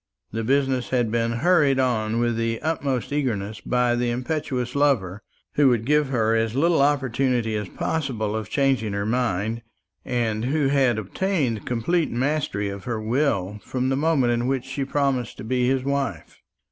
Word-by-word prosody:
The 115 +1 -3
business 135 0 +1
had 120 -4 +1
been 115 0 +1
hurried 155 -7 +4
on 115 -3 +1
with 120 -1 +1
the 115 0 -1
utmost 140 -5 -1
eagerness 110 -8 -2
by 125 -1 +1
the 120 0 0
impetuous 125 -1 -2
lover, 115 -10 +1 0.3
who 145 -2 +5
would 115 -3 +1
give 150 0 +2
her 115 -3 +2
as 115 0 0
little 165 +2 +3
opportunity 130 -5 +1
as 105 -3 -3
possible 120 -9 -2
of 110 -1 -4
changing 130 -7 +1
her 100 0 -2
mind, 115 -1 -1 0.4
and 115 -3 -1
who 140 +1 +1
had 135 -5 +3
obtained 125 - -1
complete 150 +8 0
mastery 130 -4 -1
of 100 -1 -6
her 120 -3 -2
will 110 -4 0
from 130 0 -2
the 135 - +1
moment 140 -5 +2
in 120 +1 -1
which 130 -2 -1
she 135 +1 -3
promised 135 -4 -1
to - - -8
be 125 +2 0
his 130 0 +1
wife. 135 - -3
125 Hz, 170 wpm, -24 LUFS, 110-140 Hz, 0.4 s, who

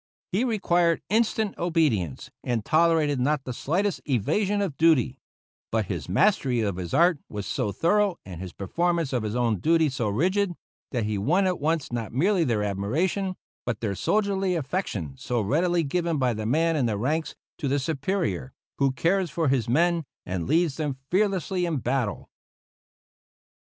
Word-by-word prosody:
He 195 +6 +1
required 175 -8 +2
instant 220 -1 +1
obedience, 150 - 0
and 120 -4 -1
tolerated 155 -3 +3
not 140 +2 +1
the 130 - -5
slightest 185 +11 -1
evasion 195 - +1
of 190 -8 -1
duty; 160 -6 +3 0.5
but 110 -2 +1
his 85 -1 -6
mastery 130 - +2
of 100 -4 -1
his 90 -2 -5
art 170 -2 +4
was 105 -2 -5
so 105 - -1
thorough 195 - +2
and 90 -3 -8
his 95 -2 -6
performance 165 - -1
of 125 - +1
his 105 +1 -3
own 115 -5 +1
duty 160 -1 +3
so 120 -5 -1
rigid 180 - +1 0.4
that 120 -4 -1
he 105 -1 -1
won 175 - +2
at 180 -2 0
once 155 -2 0
not 115 -3 -3
merely 180 - +2
their 115 -7 0
admiration, 155 - -1 0.3
but 120 -4 -3
that 105 -4 -1
soldierly 195 - +1
affection 135 - -3
so 120 -1 -1
readily 170 - +1
given 170 +2 -1
by 130 -3 +1
the 110 0 -3
man 165 +6 +2
in 135 -6 +1
the 105 -2 -1
ranks 150 +7 -1 0.2
to 145 - -1
the 140 +2 +1
superior 140 - -2 0.3
who 135 -1 +3
cares 175 +6 +1
for 165 -2 0
his 130 -4 +1
men 170 +5 +2 0.2
and 90 -2 -3
leads 165 -3 +2
them 145 -4 -2
fearlessly 190 -2 +1
in 170 -3 0
battle. 130 +2 -2
150 Hz, 165 wpm, -26 LUFS, 115-175 Hz, 0.5 s, art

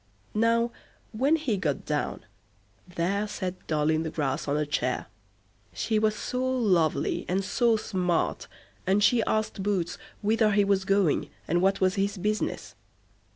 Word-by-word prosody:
Now, 230 +2 +2 0.4
when 270 +8 +2
he 275 -10 -1
got 150 -7 -2
down; - - -2 0.6
there 185 +4 -1
sat 185 -3 -5
Doll 155 0 +1
i' 155 - +2
the 160 0 -2
Grass 145 -4 -2
on 145 +1 +1
a 150 - 0
chair; 130 -3 -1 0.7
she 220 -2 0
was 215 0 +2
so 250 0 -3
lovely 210 - +1
and 190 +2 0
so 230 +3 +2
smart, 180 -5 -1 0.4
and 200 +2 +3
she 230 +3 +5
asked 215 -2 -1
Boots 190 -4 -1 0.2
whither 215 0 +3
he 205 0 +4
was 195 -1 +1
going, 195 -5 +2 0.2
and 175 +2 +2
what 195 +1 +2
was 185 0 +3
his 200 +1 -1
business. 195 - -2
195 Hz, 155 wpm, -27 LUFS, 175-215 Hz, 0.7 s, she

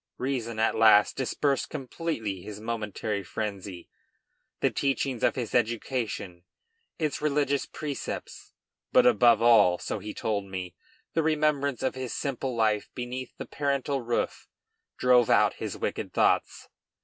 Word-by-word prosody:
Reason 125 -4 -2
at 110 0 +2
last 110 -2 +6
dispersed 135 +1 0
completely 125 - -4
his 105 +2 -8
momentary 110 -2 -3
frenzy. 100 -3 -5 0.7
The - - +2
teachings 135 -3 -1
of - - +2
his 120 -4 -4
education, 115 -6 -1 0.5
its 155 -4 -2
religious 145 -2 +1
precepts, 145 -3 -6 0.4
but - - +5
above 115 -1 +5
all, 115 -7 +6
so 105 - -4
he 105 +2 -7
told 105 -3 -1
me, 95 -2 -6 0.4
the 165 - +2
remembrance 150 -4 +1
of 130 - +1
his 130 -2 -5
simple 135 -2 -3
life 110 -2 +1
beneath 125 0 -6
the - - -6
parental 140 -1 -1
roof 120 0 -2 0.5
drove 125 -2 +4
out - - +4
his - - -4
wicked - - -3
thoughts. - - +1
120 Hz, 135 wpm, -27 LUFS, 105-135 Hz, 0.7 s, last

